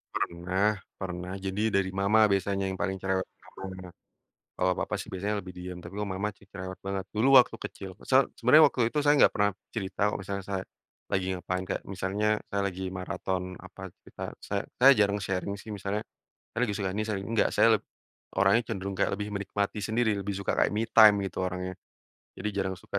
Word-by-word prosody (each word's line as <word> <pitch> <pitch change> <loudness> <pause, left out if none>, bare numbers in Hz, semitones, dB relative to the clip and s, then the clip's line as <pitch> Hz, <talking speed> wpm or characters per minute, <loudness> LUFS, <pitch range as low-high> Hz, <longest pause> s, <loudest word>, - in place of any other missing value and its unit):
Pernah 95 +4 0 0.2
pernah, 90 0 -5
jadi 100 +3 -1
dari 95 -1 +2
mama 100 +3 +4
biasanya 95 0 0
yang 95 - -6
paling 95 -1 0
cerewet 95 0 -1 0.3
banget. 95 -1 -7 0.7
Kalau 90 0 +3
papa - - -3
sih - - -6
biasanya 100 +2 -2
lebih 90 -1 -9
diem, 90 0 -7
tapi 85 +3 -10
kalau 105 - -2
mama 100 +2 -2
ci - - -22
cerewet 95 -1 -6
banget, 95 -1 -3
dulu 130 +4 +7
waktu 125 - +2
kecil 95 - -7
se 135 +1 +4
sebenarnya 150 +7 +7
waktu 120 -2 0
itu 150 - +1
saya 145 0 +4
nggak - - +5
pernah 105 0 +2 0.2
cerita 100 -3 -4
kalau - - -3
misalnya 100 0 -4
saya 95 -1 -3 0.5
lagi 95 -1 0
ngapain, 90 0 -3
kayak 95 - -3
misalnya 100 +2 -1 0.2
saya 100 - 0
lagi 95 0 -5
maraton 90 0 -3
apa 95 - -13 0.2
cerita - - -9 0.2
saya - - -1
saya 135 +2 +8
jarang 100 0 +3
sharing 95 +1 -2
sih, 105 +2 -9
misalnya 100 +1 -3 0.5
saya 120 - -1
lagi 105 -5 0
suka 100 -3 -1
ini 110 - 0
sharing, 100 -3 -3
enggak 110 - +3
saya - - +5 0.7
orangnya 100 +4 +5
cenderung 95 0 -4
kayak 100 - +2
lebih 105 +1 -3
menikmati 100 +1 -2
sendiri, 110 0 +1
lebih 100 0 -3
suka 100 - -1
kayak - - +3
me 110 +2 -1
time 110 -2 +7
gitu 95 - -4
orangnya. 90 0 -3 0.6
Jadi 105 - -2
jarang 95 -1 -1
suka - - -4
100 Hz, 195 wpm, -28 LUFS, 95-105 Hz, 0.7 s, saya